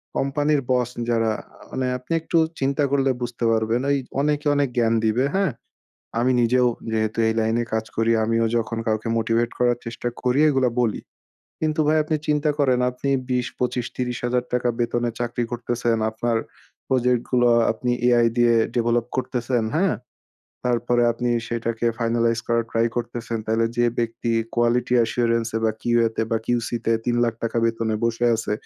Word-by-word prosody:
কোম্পানির 145 Hz, +1 st, +1 dB
বস 125 Hz, -2 st, +2 dB, 0.2 s
যারা 115 Hz, -1 st, +2 dB
আ -, -, -20 dB
মানে 130 Hz, -, -2 dB
আপনি 125 Hz, +5 st, -15 dB
একটু 165 Hz, -, 0 dB, 0.2 s
চিন্তা 140 Hz, +2 st, +1 dB
করলে 135 Hz, -1 st, +2 dB
বুঝতে 120 Hz, 0 st, -4 dB
পারবেন 110 Hz, +2 st, +1 dB
এই 140 Hz, -, +1 dB, 0.2 s
অনেকে 150 Hz, +1 st, 0 dB
অনেক 140 Hz, -2 st, +1 dB
জ্ঞান 115 Hz, -1 st, +3 dB
দিবে। 115 Hz, +4 st, +2 dB
হ্যাঁ? 195 Hz, -5 st, +2 dB, 0.7 s
আমি 125 Hz, +2 st, +2 dB
নিজেও 125 Hz, +1 st, +3 dB, 0.3 s
যেহেতু 110 Hz, 0 st, -1 dB
এই 110 Hz, -, 0 dB
লাইনে 110 Hz, +2 st, +1 dB
কাজ 110 Hz, 0 st, 0 dB
করি 115 Hz, +1 st, +2 dB
আমিও 115 Hz, +1 st, +1 dB
যখন 115 Hz, 0 st, -1 dB
কাউকে 110 Hz, 0 st, -1 dB
মোটিভেট 115 Hz, +1 st, +1 dB
করার 120 Hz, -1 st, +2 dB
চেষ্টা 115 Hz, +1 st, -3 dB
করি 125 Hz, +2 st, +2 dB
এগুলা 135 Hz, -3 st, +2 dB
বলি। 115 Hz, -4 st, 0 dB, 0.6 s
কিন্তু 155 Hz, 0 st, -1 dB
ভাই 155 Hz, +1 st, +4 dB
আপনি 155 Hz, +1 st, -1 dB
চিন্তা 150 Hz, 0 st, +2 dB
করেন 130 Hz, -3 st, +3 dB
আপনি 125 Hz, +2 st, -4 dB, 0.2 s
২০, 125 Hz, -1 st, 0 dB
২৫, 125 Hz, -1 st, -1 dB
৳৩০,০০০ 125 Hz, 0 st, -1 dB
বেতনে 120 Hz, 0 st, 0 dB
চাকরি 120 Hz, 0 st, -2 dB
করতেছেন। 120 Hz, -1 st, -1 dB
আপনার 115 Hz, +1 st, -1 dB, 0.5 s
প্রজেক্টগুলো 125 Hz, -1 st, +2 dB, 0.2 s
আপনি 120 Hz, +2 st, -2 dB, 0.3 s
Ai 120 Hz, 0 st, +4 dB
দিয়ে 120 Hz, -1 st, +4 dB, 0.2 s
ডেভেলপ 120 Hz, 0 st, +1 dB
করতেছেন, 125 Hz, -2 st, -1 dB
হ্যাঁ? 185 Hz, +4 st, +2 dB, 0.7 s
তারপরে 120 Hz, 0 st, +1 dB
আপনি 120 Hz, +1 st, -2 dB, 0.2 s
সেটাকে 115 Hz, 0 st, -2 dB
ফাইনালাইজ 115 Hz, 0 st, +1 dB
করার 115 Hz, -1 st, +1 dB
ট্রাই 115 Hz, 0 st, +2 dB
করতেছেন। 120 Hz, -1 st, -3 dB
তাহলে 110 Hz, +1 st, +1 dB
যে 120 Hz, -, +3 dB
ব্যক্তি 115 Hz, 0 st, -2 dB, 0.2 s
কোয়ালিটি 120 Hz, +1 st, +2 dB
অ্যাসুরেন্স 115 Hz, 0 st, +1 dB, 0.2 s
বা 110 Hz, -, +3 dB
কিউতে 115 Hz, -2 st, +1 dB
বা 115 Hz, -, +2 dB
কিউসিতে 120 Hz, -1 st, -1 dB
৳৩,০০,০০০ 120 Hz, -1 st, 0 dB
বেতনে 115 Hz, -1 st, 0 dB
বসে 115 Hz, +1 st, 0 dB
আছে, 110 Hz, -1 st, -3 dB
120 Hz, 155 wpm, -23 LUFS, 115-125 Hz, 0.7 s, ভাই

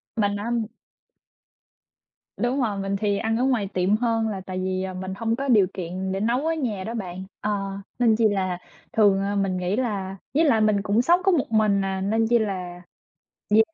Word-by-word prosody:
Mình 205 Hz, -2 st, +1 dB
nắm 230 Hz, +2 st, -1 dB, 1.7 s
Đúng 255 Hz, +3 st, 0 dB
rồi. 210 Hz, -5 st, -1 dB
Mình 195 Hz, 0 st, -1 dB
thì 205 Hz, -1 st, +1 dB
ăn 225 Hz, +2 st, 0 dB
ở 245 Hz, -, +1 dB
ngoài 250 Hz, -6 st, +1 dB
tiệm 185 Hz, +3 st, +2 dB
hơn 225 Hz, -1 st, +1 dB
là 195 Hz, -3 st, -4 dB
tại 185 Hz, 0 st, -5 dB
vì, 185 Hz, 0 st, -1 dB
ờ, 190 Hz, 0 st, -4 dB
mình 185 Hz, +1 st, -5 dB
hông 225 Hz, +1 st, 0 dB
có 275 Hz, +3 st, -3 dB
điều 210 Hz, -7 st, +5 dB
kiện 185 Hz, +1 st, -4 dB
để 190 Hz, -, -2 dB
nấu 240 Hz, +7 st, 0 dB
ở 325 Hz, -, +2 dB
nhà 230 Hz, -11 st, -2 dB
đó 225 Hz, -, -5 dB
bạn. 185 Hz, -5 st, -5 dB, 0.2 s
Ờ, 210 Hz, -, -1 dB, 0.5 s
nên 230 Hz, -3 st, +4 dB
chi 225 Hz, 0 st, +4 dB
là 185 Hz, -3 st, -1 dB, 0.4 s
thường, 200 Hz, -3 st, +4 dB
ờ, 200 Hz, +1 st, -1 dB
mình 195 Hz, -2 st, 0 dB
nghĩ 180 Hz, +2 st, -1 dB
là 200 Hz, -6 st, -2 dB, 0.2 s
với 310 Hz, +4 st, +4 dB
lại 265 Hz, -9 st, +4 dB
mình 215 Hz, -2 st, +3 dB
cũng 205 Hz, +4 st, +2 dB
sống 345 Hz, +8 st, +4 dB
có 385 Hz, -, +4 dB
một 285 Hz, -9 st, 0 dB
mình 210 Hz, -3 st, +3 dB
à, 190 Hz, 0 st, -2 dB
nên 220 Hz, +3 st, +1 dB
chi 235 Hz, +1 st, +4 dB
là 180 Hz, -4 st, -3 dB, 0.7 s
đi 215 Hz, +1 st, +6 dB
205 Hz, 210 wpm, -24 LUFS, 190-230 Hz, 1.7 s, đi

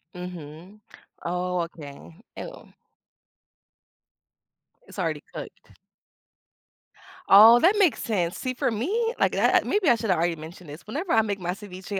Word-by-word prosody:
Mhm. 180 Hz, +2 st, -9 dB, 0.4 s
Oh, 180 Hz, +1 st, -2 dB
okay. 160 Hz, -1 st, -9 dB, 0.2 s
Ew. -, -, -10 dB, 2.1 s
It's -, -, -11 dB
already -, -, -2 dB
cooked. -, -, -10 dB, 1.5 s
Oh, 220 Hz, +4 st, +9 dB
that 390 Hz, +5 st, +4 dB
makes 360 Hz, -7 st, +2 dB
sense. 180 Hz, -7 st, -1 dB
See, 255 Hz, 0 st, -3 dB
for 245 Hz, -, -1 dB
me, 415 Hz, -, -1 dB
like, -, -, +2 dB
that -, -, +3 dB
maybe 410 Hz, -5 st, 0 dB
I 240 Hz, -, +5 dB
should've 220 Hz, -6 st, 0 dB
already 170 Hz, +1 st, 0 dB
mentioned 160 Hz, +1 st, -11 dB
this. 155 Hz, +5 st, -11 dB
Whenever 315 Hz, -, -3 dB
I 225 Hz, -, +5 dB
make 205 Hz, -2 st, -3 dB
my 180 Hz, -1 st, -3 dB
ceviche, 190 Hz, 0 st, -7 dB
190 Hz, 135 wpm, -25 LUFS, 175-240 Hz, 2.1 s, Oh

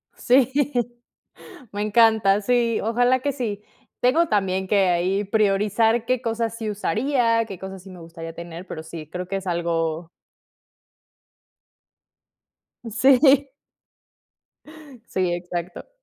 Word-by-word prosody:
Sí, 255 Hz, 0 st, +3 dB, 1.2 s
me 205 Hz, +1 st, -3 dB
encanta, 215 Hz, -2 st, +4 dB
sí, 235 Hz, 0 st, +1 dB
ojalá 245 Hz, +3 st, +2 dB
que 285 Hz, +1 st, -1 dB
sí. 215 Hz, -6 st, -4 dB, 0.4 s
Tengo 310 Hz, +7 st, +3 dB
también 190 Hz, -2 st, 0 dB
que 195 Hz, -2 st, +3 dB
ahí 185 Hz, +3 st, 0 dB
priorizar 215 Hz, +2 st, +1 dB
qué 255 Hz, -1 st, 0 dB
cosas 230 Hz, -1 st, -2 dB
sí 220 Hz, -2 st, -4 dB
usaría, 230 Hz, +2 st, +1 dB
qué 195 Hz, -5 st, -8 dB
cosas 190 Hz, -1 st, -8 dB
sí 195 Hz, -, -13 dB
me 180 Hz, -1 st, -12 dB
gustaría 165 Hz, 0 st, -9 dB
tener, 170 Hz, +1 st, -9 dB
pero 160 Hz, -3 st, -7 dB
sí, 160 Hz, -2 st, -9 dB
creo 180 Hz, +2 st, -6 dB
que 195 Hz, -, -2 dB
es 195 Hz, 0 st, -6 dB
algo 165 Hz, -1 st, -2 dB, 2.8 s
sí. 270 Hz, +3 st, +4 dB, 1.6 s
Sí, 180 Hz, -2 st, 0 dB
exacto. 175 Hz, -, -6 dB
205 Hz, 115 wpm, -23 LUFS, 180-235 Hz, 2.8 s, encanta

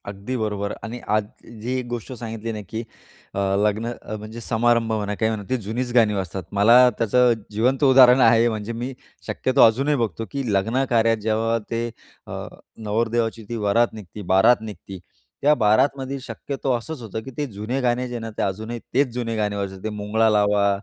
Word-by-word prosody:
अगदी 100 Hz, +5 st, -5 dB
बरोबर 105 Hz, -2 st, -2 dB
आणि 115 Hz, +2 st, -6 dB, 0.2 s
आज 110 Hz, -, +2 dB, 0.4 s
जी 125 Hz, +3 st, -2 dB
एक 125 Hz, -, -5 dB
गोष्ट 120 Hz, 0 st, -5 dB
सांगितली 115 Hz, -1 st, -5 dB
ना, 105 Hz, -1 st, -5 dB
की 110 Hz, -, -3 dB, 0.5 s
अ, -, -, -3 dB, 0.2 s
लग्न 110 Hz, +3 st, 0 dB
अ, 110 Hz, -, -6 dB
म्हणजे 110 Hz, +2 st, -9 dB
समारंभ 115 Hz, 0 st, +1 dB
म्हणा, 105 Hz, -1 st, -1 dB
काही 110 Hz, +2 st, +1 dB
म्हणा, 110 Hz, -2 st, -4 dB
ती 130 Hz, -, +1 dB
जुनीच 120 Hz, +5 st, -3 dB
गाणी 115 Hz, -4 st, +4 dB
वाजतात. 95 Hz, -1 st, -3 dB
मला 115 Hz, +5 st, +6 dB
त्याचं 120 Hz, +2 st, +3 dB, 0.2 s
जिवंत 125 Hz, +7 st, +1 dB
उदाहरण 130 Hz, -2 st, +7 dB
आहे, 115 Hz, 0 st, +5 dB
म्हणजे 110 Hz, 0 st, -4 dB
मी 120 Hz, +3 st, -4 dB, 0.3 s
शक्यतो 130 Hz, +1 st, +1 dB
अजूनही 135 Hz, +6 st, +2 dB
बघतो 115 Hz, -2 st, -2 dB
की 140 Hz, -1 st, -3 dB
लग्नकार्यात 115 Hz, +2 st, +2 dB
जेव्हा 110 Hz, +2 st, +1 dB
ते 115 Hz, 0 st, -1 dB, 0.4 s
अ, -, -, -6 dB, 0.3 s
नवरदेवाची 115 Hz, +1 st, -1 dB
ती 120 Hz, -, -3 dB
वरात 115 Hz, +2 st, +2 dB
निघते. 105 Hz, -1 st, -9 dB
बारात 110 Hz, +6 st, +5 dB
निघते, 105 Hz, -3 st, -9 dB, 0.4 s
त्या 150 Hz, +2 st, +5 dB
बारातमध्ये 130 Hz, +4 st, +1 dB
शक्यतो 135 Hz, +3 st, -4 dB
असंच 140 Hz, +4 st, -7 dB
होतं 110 Hz, -1 st, -5 dB
की 135 Hz, -, -8 dB
ते 150 Hz, -, -1 dB
जुने 105 Hz, +6 st, -3 dB
गाणे 125 Hz, 0 st, 0 dB
जे 120 Hz, -1 st, -5 dB
ना 115 Hz, 0 st, -6 dB
ते -, -, -1 dB
अजूनही 110 Hz, +5 st, -3 dB
तेच 140 Hz, +2 st, +3 dB
जुने 120 Hz, -2 st, -3 dB
गाणे 105 Hz, -1 st, -1 dB
वाजतात. 95 Hz, -1 st, -4 dB
ते 110 Hz, -, -2 dB
मुंगळा 105 Hz, +2 st, +1 dB
लावा, 105 Hz, -1 st, +3 dB
115 Hz, 180 wpm, -23 LUFS, 105-125 Hz, 0.5 s, उदाहरण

